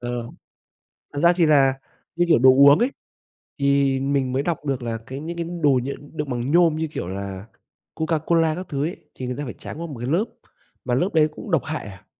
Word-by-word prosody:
ờ, 120 Hz, -1 st, -4 dB, 0.8 s
thật 145 Hz, -, -3 dB
ra 170 Hz, -, +6 dB
thì 175 Hz, -, +3 dB
là 140 Hz, -3 st, +5 dB, 0.4 s
như, 175 Hz, +1 st, +2 dB
kiểu, 160 Hz, -, +5 dB
đồ 130 Hz, +2 st, +7 dB
uống 140 Hz, +4 st, +7 dB
ấy, 245 Hz, +3 st, +2 dB, 0.7 s
thì 140 Hz, -1 st, +2 dB
mình 135 Hz, -1 st, 0 dB
mới 135 Hz, +2 st, 0 dB
đọc 165 Hz, -3 st, -3 dB
được 135 Hz, -3 st, -2 dB
là 115 Hz, -1 st, -2 dB
cái 130 Hz, +2 st, -7 dB
những 170 Hz, +3 st, -6 dB
cái 170 Hz, -, -2 dB, 0.2 s
đồ 140 Hz, -3 st, +4 dB
nh 135 Hz, -, -4 dB, 0.3 s
đựng 150 Hz, -2 st, -3 dB
bằng 125 Hz, +1 st, -2 dB
nhôm 170 Hz, -1 st, +4 dB
như, 160 Hz, 0 st, -2 dB
kiểu, 145 Hz, -, -5 dB
là 95 Hz, +1 st, -6 dB, 0.5 s
Coca-Cola 160 Hz, 0 st, +1 dB
các 180 Hz, +2 st, -6 dB
thứ 140 Hz, -3 st, -2 dB
ấy, 170 Hz, -, -4 dB, 0.2 s
thì 130 Hz, -, -5 dB
người 125 Hz, -, -3 dB
ta 145 Hz, -, -3 dB
phải 120 Hz, -, -6 dB
tráng 160 Hz, -, -8 dB
qua 170 Hz, -, -4 dB
một 145 Hz, -, -8 dB
cái 120 Hz, -, -4 dB
lớp 175 Hz, +9 st, +2 dB, 0.6 s
mà 125 Hz, -, +1 dB
lớp 175 Hz, +9 st, +1 dB
đấy 155 Hz, -2 st, +4 dB
cũng 195 Hz, -, -9 dB
độc 165 Hz, -, +2 dB
hại 155 Hz, 0 st, -4 dB
à. 100 Hz, -1 st, -11 dB
140 Hz, 230 wpm, -23 LUFS, 130-160 Hz, 0.8 s, đồ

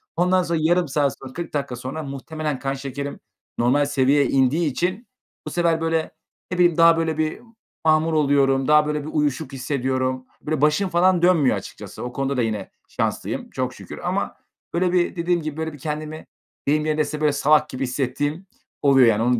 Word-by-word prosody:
Ondan 180 Hz, +1 st, +3 dB
sonra, 170 Hz, -1 st, -1 dB
yarım 175 Hz, +2 st, +2 dB
saat 140 Hz, -1 st, +1 dB
sonra, 130 Hz, -1 st, -10 dB
40 170 Hz, +1 st, -6 dB
dakika 140 Hz, -4 st, -2 dB
sonra 130 Hz, +6 st, -5 dB
muhtemelen 145 Hz, +1 st, -4 dB
kan 135 Hz, 0 st, -2 dB
şekerim 140 Hz, +1 st, -5 dB, 0.4 s
normal 130 Hz, +5 st, +3 dB
seviyeye 140 Hz, 0 st, +3 dB
indiği 135 Hz, +5 st, +2 dB
için, 185 Hz, -, -2 dB, 0.4 s
bu -, -, -4 dB
sefer, 170 Hz, -2 st, +1 dB
böyle, 165 Hz, -1 st, 0 dB, 0.4 s
ne 180 Hz, -, -2 dB
bileyim, 175 Hz, -2 st, +4 dB
daha 165 Hz, 0 st, +6 dB
böyle 160 Hz, -1 st, -1 dB
bir 155 Hz, 0 st, -1 dB, 0.5 s
mahmur 160 Hz, +1 st, +3 dB
oluyorum. 140 Hz, -3 st, +3 dB
Daha 150 Hz, 0 st, +5 dB
böyle 150 Hz, 0 st, -1 dB
bir 150 Hz, -, -6 dB
uyuşuk 145 Hz, -2 st, -1 dB
hissediyorum. 130 Hz, -1 st, -1 dB, 0.2 s
Böyle, 155 Hz, -2 st, -2 dB
başım 150 Hz, +6 st, +3 dB
falan 180 Hz, 0 st, +3 dB
dönmüyor 170 Hz, -7 st, +4 dB
açıkçası. -, -, -9 dB
O 125 Hz, 0 st, -5 dB
konuda 135 Hz, 0 st, -1 dB
da -, -, +2 dB
yine 110 Hz, -4 st, -3 dB, 0.2 s
şanslıyım -, -, -3 dB
çok -, -, -3 dB
şükür -, -, -10 dB
ama, -, -, -2 dB, 0.4 s
böyle, 180 Hz, +1 st, +1 dB
bir 180 Hz, 0 st, +1 dB
dediğim 170 Hz, 0 st, 0 dB
gibi, 155 Hz, -1 st, -5 dB
böyle, 160 Hz, -1 st, -3 dB
bir 145 Hz, -, -11 dB
kendimi 155 Hz, +2 st, -5 dB, 0.4 s
deyim 150 Hz, +2 st, +2 dB
yerinde 155 Hz, 0 st, +1 dB
ise, 150 Hz, +1 st, -3 dB
böyle, 150 Hz, -1 st, +3 dB
"salak" 150 Hz, +1 st, +3 dB
gibi 130 Hz, +1 st, -4 dB
hissettiğim 145 Hz, +6 st, -2 dB, 0.4 s
oluyor, 135 Hz, -3 st, +6 dB
yani. 110 Hz, 0 st, +3 dB
Onu 125 Hz, 0 st, +2 dB
150 Hz, 185 wpm, -22 LUFS, 135-165 Hz, 0.5 s, daha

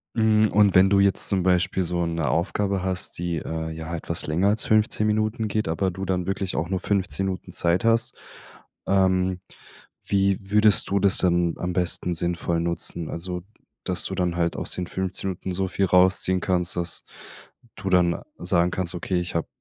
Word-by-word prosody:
Hm, 110 Hz, -1 st, +3 dB
und 105 Hz, -2 st, +3 dB
wenn 95 Hz, +1 st, +6 dB
du 100 Hz, -, +4 dB
jetzt 100 Hz, -1 st, +3 dB
zum 95 Hz, -2 st, +1 dB
Beispiel 90 Hz, +1 st, +1 dB
so 85 Hz, 0 st, -1 dB
'ne 85 Hz, -3 st, -2 dB
Aufgabe 95 Hz, +5 st, -1 dB
hast, 95 Hz, -1 st, -2 dB
die, 85 Hz, -1 st, -3 dB
äh, 80 Hz, +1 st, -5 dB
ja 80 Hz, +1 st, -6 dB
etwas 85 Hz, 0 st, -4 dB
länger 85 Hz, +6 st, +1 dB
als 110 Hz, -, 0 dB
15 110 Hz, 0 st, +2 dB
Minuten 110 Hz, +1 st, -1 dB
geht, 110 Hz, +1 st, -2 dB
aber 80 Hz, +4 st, 0 dB
du 95 Hz, +2 st, -6 dB
dann 90 Hz, -1 st, -2 dB
wirklich 95 Hz, -1 st, -3 dB
auch 80 Hz, +3 st, -2 dB
nur 95 Hz, -, -1 dB
15 95 Hz, 0 st, -1 dB
Minuten 95 Hz, -2 st, -5 dB
Zeit 85 Hz, +3 st, 0 dB
hast, 115 Hz, 0 st, +1 dB, 0.7 s
ähm, 95 Hz, -1 st, +1 dB, 0.7 s
wie 100 Hz, -1 st, +1 dB
würdest 105 Hz, 0 st, +6 dB
du 100 Hz, -, +2 dB
das 100 Hz, -1 st, +4 dB
dann 85 Hz, -2 st, +2 dB
am 90 Hz, 0 st, -3 dB
besten 90 Hz, 0 st, +1 dB
sinnvoll 85 Hz, 0 st, -1 dB
nutzen? 85 Hz, -1 st, -1 dB
Also, 90 Hz, +1 st, -4 dB, 0.4 s
dass 90 Hz, -1 st, 0 dB
du 95 Hz, -, -3 dB
dann 90 Hz, -2 st, -1 dB
halt 85 Hz, -1 st, -1 dB
aus -, -, -3 dB
den 90 Hz, -, -2 dB
15 95 Hz, +1 st, -3 dB
Minuten 95 Hz, +1 st, -6 dB
so 95 Hz, +1 st, -1 dB
viel 95 Hz, +1 st, 0 dB
rausziehen 95 Hz, 0 st, +3 dB
kannst, 90 Hz, -2 st, 0 dB
dass 85 Hz, 0 st, -2 dB, 0.7 s
du 95 Hz, -, -5 dB
dann 90 Hz, -2 st, +2 dB, 0.2 s
sagen 90 Hz, 0 st, +1 dB
kannst, 90 Hz, -2 st, -1 dB
okay, 90 Hz, +1 st, -2 dB
ich 90 Hz, 0 st, -5 dB
habe 85 Hz, -, -1 dB
90 Hz, 185 wpm, -24 LUFS, 85-95 Hz, 0.7 s, wenn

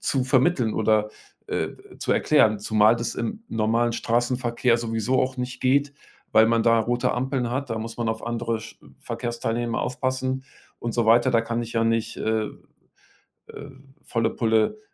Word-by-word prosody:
zu 130 Hz, -2 st, 0 dB
vermitteln 130 Hz, -3 st, +2 dB
oder, 110 Hz, -1 st, +2 dB, 0.4 s
äh, -, -, -1 dB, 0.3 s
zu -, -, -3 dB
erklären, 110 Hz, -1 st, +3 dB
zumal 110 Hz, +2 st, +3 dB
das 115 Hz, 0 st, -3 dB
im 215 Hz, -, -4 dB
normalen 115 Hz, +2 st, +1 dB
Straßenverkehr 120 Hz, 0 st, +1 dB
sowieso 115 Hz, +2 st, 0 dB
auch 130 Hz, 0 st, -1 dB
nicht 125 Hz, 0 st, -5 dB
geht, 140 Hz, +2 st, +2 dB, 0.4 s
weil 110 Hz, 0 st, +6 dB
man 115 Hz, 0 st, +2 dB
da 115 Hz, 0 st, +4 dB
rote 120 Hz, +2 st, 0 dB
Ampeln 125 Hz, -1 st, -1 dB
hat, 130 Hz, +2 st, -2 dB
da 110 Hz, -, -2 dB
muss 115 Hz, +1 st, -6 dB
man 115 Hz, -1 st, -1 dB
auf 110 Hz, 0 st, -3 dB
andere 115 Hz, -1 st, -2 dB
sch 110 Hz, -, -11 dB, 0.2 s
Verkehrsteilnehmer 120 Hz, 0 st, -3 dB
aufpassen 130 Hz, 0 st, -2 dB, 0.3 s
und 120 Hz, -1 st, -4 dB
so 120 Hz, -2 st, +1 dB
weiter. 120 Hz, +3 st, +5 dB
Da 115 Hz, -, +3 dB
kann 115 Hz, +1 st, -2 dB
ich 115 Hz, 0 st, -8 dB
ja 115 Hz, 0 st, +2 dB
nicht, 115 Hz, -1 st, 0 dB
äh, 110 Hz, -1 st, 0 dB, 1.0 s
äh, 140 Hz, 0 st, -10 dB, 0.3 s
volle 115 Hz, -2 st, 0 dB
Pulle 115 Hz, -, +1 dB
115 Hz, 165 wpm, -24 LUFS, 115-125 Hz, 1.0 s, weil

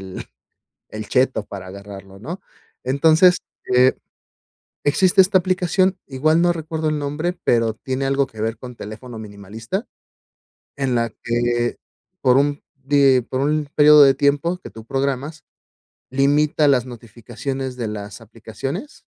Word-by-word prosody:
el 95 Hz, -1 st, -8 dB, 0.6 s
el 110 Hz, -1 st, -7 dB
cheto 130 Hz, -4 st, +1 dB
para 95 Hz, -2 st, -8 dB
agarrarlo, 100 Hz, 0 st, -11 dB
¿no? 165 Hz, -, -7 dB, 0.4 s
Entonces, 160 Hz, +7 st, +4 dB, 0.4 s
eh, 130 Hz, +1 st, +5 dB, 0.9 s
existe 185 Hz, +6 st, +4 dB
esta 190 Hz, 0 st, +4 dB
aplicación, 185 Hz, +1 st, +1 dB
igual 155 Hz, +4 st, +1 dB
no 175 Hz, 0 st, +3 dB
recuerdo 160 Hz, -1 st, -3 dB
el 150 Hz, -1 st, -1 dB
nombre, 150 Hz, +5 st, -2 dB
pero 115 Hz, -2 st, +2 dB
tiene 130 Hz, +4 st, -4 dB
algo 135 Hz, 0 st, +1 dB
que 110 Hz, -, -14 dB
ver 110 Hz, 0 st, -2 dB
con 125 Hz, -1 st, -9 dB
teléfono 115 Hz, +3 st, -9 dB
minimalista, 110 Hz, -, -6 dB, 0.9 s
en 135 Hz, -3 st, -1 dB
la 115 Hz, -1 st, 0 dB
que 120 Hz, 0 st, 0 dB, 0.4 s
por 125 Hz, -2 st, +4 dB
un 145 Hz, +1 st, 0 dB
de 135 Hz, -1 st, +3 dB
por 130 Hz, -, -2 dB
un 150 Hz, +1 st, 0 dB
periodo 150 Hz, 0 st, +8 dB
de 135 Hz, -1 st, +5 dB
tiempo 145 Hz, +5 st, +1 dB
que -, -, -11 dB
tú 110 Hz, +1 st, -12 dB
programas, 140 Hz, +5 st, -3 dB, 0.7 s
limita 145 Hz, +3 st, +2 dB
las 130 Hz, -4 st, +3 dB
notificaciones 120 Hz, +3 st, -6 dB
de 115 Hz, -3 st, -3 dB
las 105 Hz, +1 st, -7 dB
aplicaciones 115 Hz, -, -7 dB
135 Hz, 140 wpm, -21 LUFS, 115-150 Hz, 0.9 s, periodo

